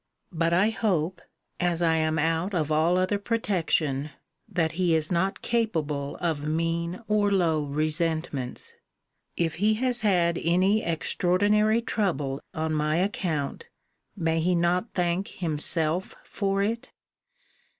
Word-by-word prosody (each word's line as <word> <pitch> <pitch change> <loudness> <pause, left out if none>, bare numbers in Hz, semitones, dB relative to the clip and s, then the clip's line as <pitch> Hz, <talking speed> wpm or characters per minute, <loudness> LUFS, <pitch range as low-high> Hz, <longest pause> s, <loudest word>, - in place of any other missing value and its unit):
But 165 -1 0
I 190 +6 +3
hope, 180 -6 -1 0.4
as 175 -2 +1
I 165 -1 +3
am 155 0 +1
out 165 +5 0
of 155 -3 0
all 160 +4 +3
other 185 +2 +1
protection, 165 - 0 0.4
that 165 -3 0
he 175 -1 +1
is 155 +1 0
not 190 +3 0
capable 155 -12 -1
of 160 -4 -1
mean 165 +4 -1
or 210 -1 +2
low 165 -5 +2
resentments. 155 -2 -2 0.6
If 165 -2 0
he 215 +1 +4
has 245 +1 0
had 175 -5 +2
any 185 +6 +2
extraordinary 205 +7 +2
trouble 150 - -1
on 160 0 -2
my 155 0 +1
account, 180 - -2 0.5
may 165 -4 0
he 175 +2 +2
not 175 +5 +1
thank 180 +1 0
himself 165 +1 -1
for 195 -1 -1
it? 230 +3 -2
170 Hz, 130 wpm, -26 LUFS, 160-195 Hz, 0.6 s, he